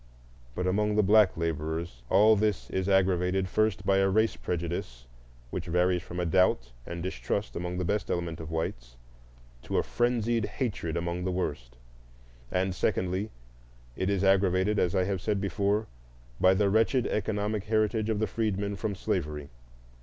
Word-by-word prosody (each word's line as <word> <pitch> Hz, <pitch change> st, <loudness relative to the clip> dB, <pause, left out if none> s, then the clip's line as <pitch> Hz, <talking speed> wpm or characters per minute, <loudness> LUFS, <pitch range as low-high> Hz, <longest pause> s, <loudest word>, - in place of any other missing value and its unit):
But 90 Hz, -, -2 dB
among 105 Hz, +3 st, +1 dB
the 105 Hz, -, +4 dB
black 105 Hz, -2 st, +5 dB
laborers 80 Hz, -3 st, -3 dB
all 105 Hz, +3 st, +6 dB
this 105 Hz, -1 st, -1 dB
is 95 Hz, +1 st, -1 dB
aggravated, 95 Hz, 0 st, +2 dB
first, 100 Hz, -1 st, 0 dB
by 95 Hz, 0 st, +3 dB
a 95 Hz, 0 st, +3 dB
race 110 Hz, +3 st, +2 dB
prejudice 85 Hz, -9 st, -4 dB, 0.5 s
which 90 Hz, -1 st, -4 dB
varies 90 Hz, +1 st, +2 dB
from 90 Hz, +1 st, -7 dB
a 90 Hz, -, 0 dB
doubt 85 Hz, -8 st, +2 dB, 0.2 s
and 85 Hz, 0 st, -5 dB
distrust 95 Hz, -, -3 dB
among 90 Hz, +1 st, -3 dB
the 90 Hz, -, -1 dB
best 105 Hz, +3 st, -1 dB
element 85 Hz, -2 st, -2 dB
of 80 Hz, -1 st, -7 dB
whites 60 Hz, -7 st, -4 dB, 0.7 s
to -, -, -3 dB
a -, -, +3 dB
frenzied 120 Hz, -2 st, 0 dB
hatred 100 Hz, -, -3 dB
among 85 Hz, +1 st, -2 dB
the 95 Hz, -, -1 dB
worst; 70 Hz, -9 st, -4 dB, 0.7 s
and, 95 Hz, 0 st, 0 dB
secondly, 95 Hz, +3 st, -1 dB, 0.7 s
it 95 Hz, -, -1 dB
is 100 Hz, -1 st, +1 dB
aggravated, 95 Hz, +1 st, +3 dB
as 90 Hz, +2 st, +1 dB
I 95 Hz, -, +3 dB
have 95 Hz, -1 st, -2 dB
said 105 Hz, -1 st, 0 dB
before, 100 Hz, +2 st, 0 dB, 0.5 s
by 95 Hz, 0 st, +5 dB
the 100 Hz, 0 st, +2 dB
wretched 115 Hz, +4 st, +3 dB
economic 105 Hz, -1 st, -1 dB
heritage 110 Hz, 0 st, +1 dB
of 110 Hz, -, +1 dB
the 110 Hz, -, +1 dB
freedmen 100 Hz, -1 st, -2 dB
from 105 Hz, -3 st, -2 dB
slavery. 75 Hz, -5 st, -3 dB
95 Hz, 160 wpm, -28 LUFS, 85-105 Hz, 0.7 s, all